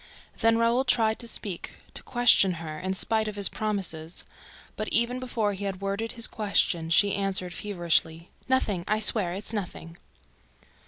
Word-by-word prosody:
Then 225 0 +3
Raoul 230 +3 +2
tried 225 -4 +2
to 235 - -5
speak, 200 -5 -5 0.2
to - - -6
question 240 -6 +4
her, 160 -2 -7
in 190 +1 -3
spite 220 +2 +1
of 210 - -5
his 200 -1 +3
promises. 185 -6 -3 0.5
But, 215 - -4
even 235 +2 +4
before 230 -5 -2
he 200 +1 -6
had 195 -2 -4
worded 200 +3 -3
his 230 - +3
question, 190 -6 0
she 200 +4 +4
answered 190 -3 -2
feverishly: 170 -4 -1 0.2
"Nothing... 210 -9 +1
I 215 +1 +1
swear 205 -5 +3
it 200 - -7
is - - -1
nothing." 175 -5 -6
205 Hz, 165 wpm, -26 LUFS, 180-225 Hz, 0.5 s, question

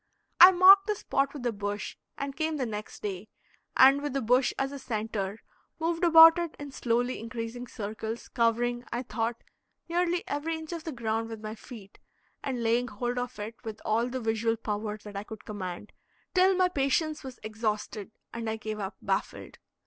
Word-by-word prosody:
I 360 +2 +12
marked 385 +2 +8
the 425 - +1
spot 275 -7 0
with 280 -4 -8
a 240 - +2
bush, 205 -1 -4 0.2
and 275 0 -4
came 315 -1 -1
the 260 - -1
next 210 -2 -7
day, 200 0 -4 0.5
and 270 +2 +7
with 290 -2 -3
the 275 - 0
bush 250 +3 +3
as 270 0 -1
a 280 - -7
centre, 215 -4 -3 0.4
moved 330 +1 -1
about 325 0 +9
it 340 -2 -3
in 290 -1 -8
slowly 245 0 0
increasing 230 +1 -6
circles, 220 +1 -5
covering, 240 +1 +1
I 240 +2 -2
thought, 230 0 -3 0.4
nearly 350 +1 0
every 320 +3 -2
inch 320 +1 -7
of 320 -3 -5
ground 225 -1 -2
with 225 -1 -7
my 215 0 -4
feet, 220 -3 -12 0.4
and 255 -4 -2
laying 235 +2 +2
hold 245 +3 -3
of 245 0 -5
it 210 +2 -5
with 220 -2 -6
all 230 +2 +1
the 260 +1 -3
visual 225 0 0
power 210 -1 -3
that 210 -1 -10
I 200 - -3
could 215 0 -10
command, 195 -1 -6 0.4
till 370 +1 +5
my 365 0 +4
patience 305 0 0
was 260 -3 -9
exhausted, 215 -1 -3 0.2
and 230 -1 -3
I 220 - -1
gave 215 -1 -5
up, 195 -1 -4
baffled. 195 0 -3
240 Hz, 185 wpm, -28 LUFS, 215-285 Hz, 0.5 s, I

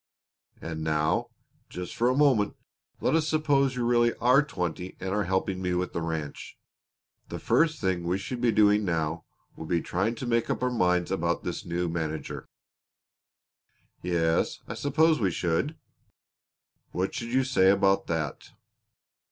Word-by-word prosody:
"And 80 -1 -5
now, 75 0 +1 0.4
just 90 -1 -6
for 120 +2 +2
a 130 - +1
moment, 130 -9 +3 0.5
let - - +1
us 160 -1 +2
suppose 140 -4 +2
you 125 -1 -1
really 120 0 +3
are 125 +4 +4
twenty 90 - -4
and 95 - -4
are 105 -1 0
helping 95 +1 -1
me 90 -1 -1
with 90 +1 -2
the 85 - -2
ranch. 80 -3 -5 0.7
The - - -5
first 155 -3 +2
thing 95 -3 0
we 85 +2 -1
should 120 +5 -5
be 120 -2 +3
doing 105 -1 +4
now 85 -2 -2 0.3
would 80 - -8
be 85 - +2
trying 95 +8 -1
to 125 - -6
make 115 -1 0
up - - -1
our 125 - +1
minds 90 -6 +1
about 85 -2 -1
this 90 - -4
new 85 +1 -1
manager." 80 -2 -4 1.5
"Yes, 85 -2 +1
I - - -4
suppose 155 +2 +2
we 100 -4 +2
should." 90 - -1 1.2
"What 95 +2 -1
should 115 - -4
you 130 +1 +3
say 130 -8 +3
about 100 0 +3
that?" 80 -4 -3
95 Hz, 160 wpm, -27 LUFS, 85-125 Hz, 1.5 s, are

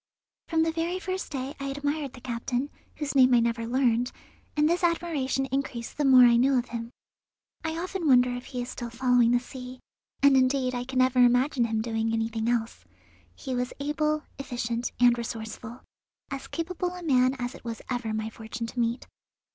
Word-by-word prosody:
From 320 -1 +2
the 325 - +1
very 335 +2 -1
first 375 0 -4
day 270 -1 -4
I 275 - -4
admired 285 0 -2
the 250 - -12
captain, 245 +3 -3 0.2
whose 295 -2 -3
name 255 -2 +6
I - - +6
never 230 0 0
learned, 245 -1 +2 0.5
and 300 0 +4
this 350 +3 +1
admiration 320 -6 0
increased 260 -4 -3
the 295 - 0
more 260 -2 +8
I 240 -1 +6
knew 265 +2 +4
of 245 - -1
him. 230 -1 -5 0.7
I 320 0 -2
often 360 -1 -3
wonder 250 -2 +5
if 245 0 -6
he 250 -3 -4
is 245 - -8
still 240 -1 -6
following 245 0 +3
the 245 0 +4
sea, 255 0 -9 0.4
and 280 -1 +7
indeed 255 0 +2
I 245 0 -3
can 260 0 -5
never 255 0 +3
imagine 245 +1 +3
him 220 -1 -1
doing 225 -1 -1
anything 225 0 -1
else. 230 -2 -1 0.5
He 265 - -5
was 250 0 -2
able, 305 +1 0 0.2
efficient, 240 -2 -3
and 245 -1 +6
resourceful; 230 0 -6 0.5
as 275 -1 -5
capable 355 +2 -3
a 360 - -8
man 255 -4 +3
as 245 0 -3
it - - -13
was 230 -1 -6
ever 245 -3 -2
my 220 0 -3
fortune 225 +1 -6
to 235 +2 -6
meet. 235 +1 0
255 Hz, 190 wpm, -27 LUFS, 235-285 Hz, 0.7 s, more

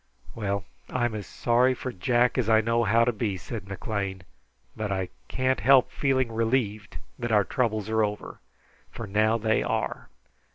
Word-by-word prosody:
"Well, 100 -3 -2 0.2
I'm 120 -2 0
as 105 -3 -5
sorry 125 +2 +2
for 130 - -5
Jack 120 +7 +2
as 115 -3 0
I 110 0 +6
know 115 +1 +1
how 115 +3 +4
to 125 - +2
be," 105 -3 -2
said 90 +3 -7
McLean, 100 -1 -4 0.5
"but 105 -2 -3
I 95 -2 -2 0.2
can't 130 0 0
help 130 +3 +5
feeling 130 -4 +1
relieved 110 -2 -1 0.2
that 120 -1 -2
our 105 -2 +5
troubles 110 -3 -1
are 110 0 +2
over, 105 0 -4 0.5
for 115 - -7
now 110 +3 +2
they 110 -1 +1
are. - - -2
110 Hz, 165 wpm, -26 LUFS, 105-120 Hz, 0.5 s, I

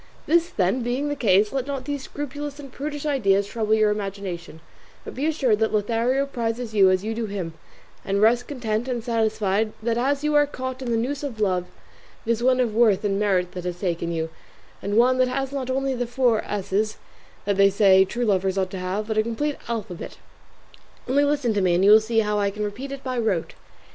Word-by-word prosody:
This, 340 +2 +3
then, 195 - 0
being 250 +5 -1
the 290 - -1
case, 210 -3 +3
let 270 -1 -2
not 275 -2 -4
these 285 -1 -3
scrupulous 290 +1 -6
and 275 -2 -10
prudish 290 +2 -5
ideas 200 -9 +2
trouble 220 +1 0
your 215 -1 +3
imagination, 195 -5 -5 0.5
but - - -7
be 280 +5 -1
assured 265 -9 +1
that 220 0 +1
Lothario 230 +6 +1
prizes 235 -3 -3
you 195 -3 +6
as 185 0 +1
you 220 +1 -2
do 225 0 -3
him, 190 -5 -4 0.5
and 200 0 0
rest 235 +3 +3
content 240 -4 -2
and 245 -3 -2
satisfied 220 -2 0
that 230 0 0
as 280 +3 0
you 300 0 +1
are 295 0 +4
caught 260 -1 -5
in 255 - -4
the 230 - +1
noose 270 +5 -2
of 270 -7 -5
love 185 -4 0 0.6
it 230 - +1
is 230 0 0
one 255 +1 +3
of 240 -4 +1
worth 220 -4 +3
and 200 -1 0
merit 185 -4 +1
that 180 - -6
has 175 -1 -4
taken 170 -3 -2
you, 160 -1 -3 0.5
and 205 +2 -1
one 255 +2 +4
that 255 - +4
has 270 +1 -2
not 270 -2 -4
only 270 +1 0
the 245 -1 -2
four 240 -2 +2
S's 210 +1 -1 0.5
that 200 -1 0
they 195 0 +6
say 195 -1 +5
true 235 +6 -2
lovers 190 -2 +1
ought 190 -1 0
to 190 - -5
have, 185 +4 -2
but 215 0 -1
a - - +6
complete 255 +7 -2
alphabet; 220 -6 -5 0.9
only 275 +3 +3
listen 285 -5 +1
to 205 - +1
me 180 -2 +3
and 185 +2 +3
you 205 - +7
will 215 +1 +8
see 225 +1 +1
how 210 -1 0
I 200 -1 +1
can 210 +1 -5
repeat 245 +7 -5
it 275 -1 -7
by 255 -2 -2
rote. 200 -8 -1
225 Hz, 220 wpm, -24 LUFS, 200-260 Hz, 0.9 s, will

